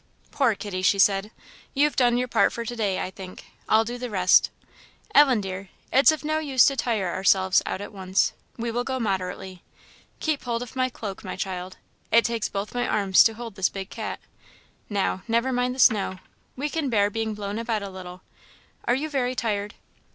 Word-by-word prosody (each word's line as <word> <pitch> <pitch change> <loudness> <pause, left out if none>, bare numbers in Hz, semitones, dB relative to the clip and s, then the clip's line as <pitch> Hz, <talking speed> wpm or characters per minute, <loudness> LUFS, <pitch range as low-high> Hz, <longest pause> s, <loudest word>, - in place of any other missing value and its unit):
"Poor 255 -6 +2
kitty!" 195 -2 -5
she 185 +2 +3
said, 195 +1 +3 0.5
"you've 290 +2 +3
done 245 -2 +3
your 250 0 0
part - - +3
for 235 - -5
to 240 - -4
day, 205 -5 0
I 185 - -3
think; 190 -1 -10 0.2
I'll 220 +1 +4
do 240 +2 -5
the 250 0 -4
rest. 185 -3 +4 0.6
Ellen, 265 -7 +6
dear, 190 0 -6 0.2
it's 275 +4 +7
of 310 - -4
no 310 +1 +1
use 275 -5 +4
to 275 - +2
tire 215 -9 -1
ourselves 190 -1 +3
out 190 - -3
at 205 - -8
once; 190 0 0 0.2
we 235 0 -3
will 240 +1 -1
go 260 0 -3
moderately. 190 -3 -3 0.6
Keep 310 -3 -1
hold 235 0 -1
of 245 - -11
my 255 0 +1
cloak, 205 -5 -7
my - - -5
child; 185 -1 -5 0.3
it 230 +1 +5
takes 230 -2 -1
both 200 +1 -4
of - - -16
my 245 0 -1
arms 195 -3 +4
to 225 - +2
hold 230 -1 -7
this 190 -2 +1
big 195 0 -7
cat. - - -5 0.7
Now, 195 -2 -1
never 235 +3 +1
mind 250 +1 0
the - - -10
snow; 210 -6 +4 0.4
we 280 +3 -2
can 300 -2 -2
bear 205 -3 +2
being 220 0 -2
blown 205 +1 -4
about 225 -3 -2
a 200 - -5
little; 185 -1 -10 0.6
are 240 - +3
you 290 +4 -2
very 255 -4 -1
tired?" 210 -4 -2
220 Hz, 205 wpm, -25 LUFS, 195-245 Hz, 0.7 s, it's